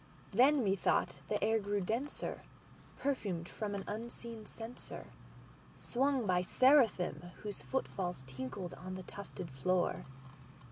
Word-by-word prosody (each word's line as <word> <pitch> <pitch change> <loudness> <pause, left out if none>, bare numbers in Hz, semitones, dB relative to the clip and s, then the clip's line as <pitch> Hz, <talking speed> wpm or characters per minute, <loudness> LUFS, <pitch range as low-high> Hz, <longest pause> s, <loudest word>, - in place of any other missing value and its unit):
Then, 265 +5 +6
methought, 195 -7 +2
the 210 - +1
air 225 0 +4
grew 205 0 0
denser, 230 +9 -2 0.6
perfumed 200 -11 -1
from 205 0 -3
an 195 - -3
unseen 230 0 -5
censerSwung 245 +3 -4
by 180 -2 +3
seraphim 225 -6 +4
whose 205 -2 -4
foot 265 - -1
falls 180 -8 -3
tinkled 130 +7 -5
on 185 +1 -6
the 185 - -6
tufted 185 -4 -7
floor. 175 +7 +1
205 Hz, 120 wpm, -35 LUFS, 180-235 Hz, 0.6 s, Then